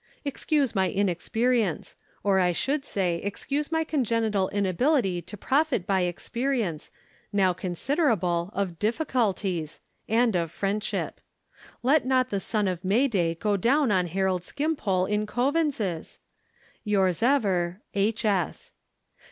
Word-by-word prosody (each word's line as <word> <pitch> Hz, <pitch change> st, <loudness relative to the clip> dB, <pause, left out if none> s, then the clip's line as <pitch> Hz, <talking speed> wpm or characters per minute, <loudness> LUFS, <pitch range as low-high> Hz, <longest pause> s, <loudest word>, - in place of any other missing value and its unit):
Excuse 285 Hz, -2 st, 0 dB
my 190 Hz, -1 st, +2 dB
inexperience; 205 Hz, +2 st, 0 dB, 0.3 s
or, 195 Hz, -2 st, +3 dB
I 180 Hz, -1 st, +3 dB
should 275 Hz, -, 0 dB
say, 180 Hz, -7 st, 0 dB
excuse 275 Hz, -, -3 dB
my 320 Hz, 0 st, +1 dB
congenital 230 Hz, -9 st, 0 dB
inability 200 Hz, -, +1 dB
to 210 Hz, -, -10 dB
profit 275 Hz, -, +1 dB
by 190 Hz, -1 st, +1 dB
experience, 200 Hz, -, -2 dB, 0.4 s
now 190 Hz, -3 st, +3 dB
considerable, 180 Hz, -, 0 dB
of 185 Hz, -4 st, -2 dB
difficulties—and 220 Hz, -, -1 dB
of 170 Hz, -2 st, 0 dB
friendship. 200 Hz, +5 st, -2 dB, 0.6 s
Let 280 Hz, +4 st, +4 dB
not 255 Hz, 0 st, +2 dB
the 200 Hz, -, 0 dB
sun 210 Hz, +1 st, -1 dB
of 180 Hz, -1 st, -3 dB
May 220 Hz, +9 st, +3 dB
day 175 Hz, -8 st, 0 dB
go 205 Hz, +4 st, 0 dB
down 260 Hz, +5 st, +3 dB
on 185 Hz, -3 st, +2 dB
Harold 185 Hz, 0 st, 0 dB
Skimpole 215 Hz, -, 0 dB
in 210 Hz, +1 st, -1 dB
Coavins's!—Yours 210 Hz, -, -2 dB
ever, 200 Hz, -8 st, +1 dB
H. 215 Hz, +3 st, 0 dB
205 Hz, 115 wpm, -26 LUFS, 185-255 Hz, 0.6 s, Let